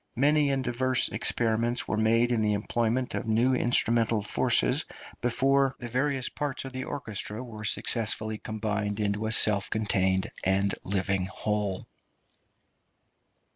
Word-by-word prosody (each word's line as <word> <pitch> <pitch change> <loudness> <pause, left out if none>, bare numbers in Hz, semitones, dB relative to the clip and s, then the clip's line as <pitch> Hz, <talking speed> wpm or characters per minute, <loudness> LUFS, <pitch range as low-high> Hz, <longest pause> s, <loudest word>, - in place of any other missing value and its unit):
Many 145 +3 +3
and 135 -1 0
diverse 130 +1 +1
experiments 115 +1 0
were - - -1
made 115 +2 +2
in 115 -2 +1
the 105 -1 +2
employment 115 +4 -1
of - - -3
new 115 +4 +2
instrumental 115 -3 +2
forces 105 - +2 0.4
before 135 +2 +2
the 120 - -7
various 130 +1 0
parts 145 -2 -4
of 135 - -8
the 130 0 -4
orchestra 110 -3 -5
were 110 -4 -9
successfully 110 0 0
combined 105 -1 -3
into 105 +1 -1
a - - -1
self 105 -2 +4
contained 95 -3 0
and 95 +1 +1
living 95 -1 -1
whole. 105 -1 -2
110 Hz, 135 wpm, -27 LUFS, 105-125 Hz, 0.4 s, self